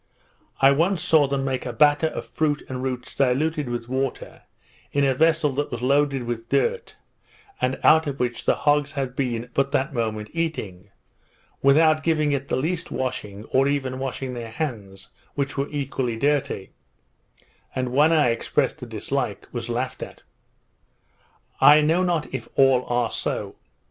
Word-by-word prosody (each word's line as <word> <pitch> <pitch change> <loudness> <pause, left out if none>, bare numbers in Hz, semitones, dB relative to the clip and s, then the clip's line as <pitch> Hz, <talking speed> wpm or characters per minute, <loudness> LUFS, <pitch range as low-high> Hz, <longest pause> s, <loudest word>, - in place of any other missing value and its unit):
I 135 0 +6
once 165 +6 +2
saw 155 -2 +4
them 135 0 -1
make 130 -1 -2
a 125 - -4
batter 145 +6 +4
of - - -5
fruit 150 -2 -1
and 130 -1 -5
roots 125 -2 -4
diluted 140 +2 0
with 120 -1 -4
water, 130 +1 -3 0.5
in 140 - +1
a 135 - +3
vessel 160 +1 +2
that 145 +2 -2
was 120 -1 -5
loaded 140 0 +2
with 120 -1 -5
dirt, 475 0 0 0.7
and 130 +1 0
out 160 0 +5
of 140 -1 -4
which 120 -1 -2
the - - +3
hogs 145 0 +1
had 135 -3 -3
been 125 -2 -2
but 140 0 +1
that 140 +1 0
moment 110 -3 -3
eating, 105 - -4 0.7
without 155 +3 +5
giving 155 -2 +1
it 140 -1 -2
the - - -1
least 165 +6 -2
washing, 105 -6 -4
or 135 +1 +3
even 135 -2 -1
washing 130 -1 -4
their 120 -2 -6
hands, 105 -8 -5 0.3
which 140 0 -2
were 140 +1 -2
equally 135 -5 -2
dirty; 140 -6 -1 1.0
and 125 -1 -2
when 150 +4 +5
I 150 -6 +4
expressed 115 - -1
a - - -6
dislike, - - -3
was 120 -1 -5
laughed 125 +2 -3
at. - - -9 1.4
I 150 +1 +8
know 165 +4 +2
not 175 -6 -1
if 130 - -5
all 135 -2 +4
are 120 -1 0
so. - - -3
135 Hz, 165 wpm, -24 LUFS, 125-150 Hz, 1.4 s, I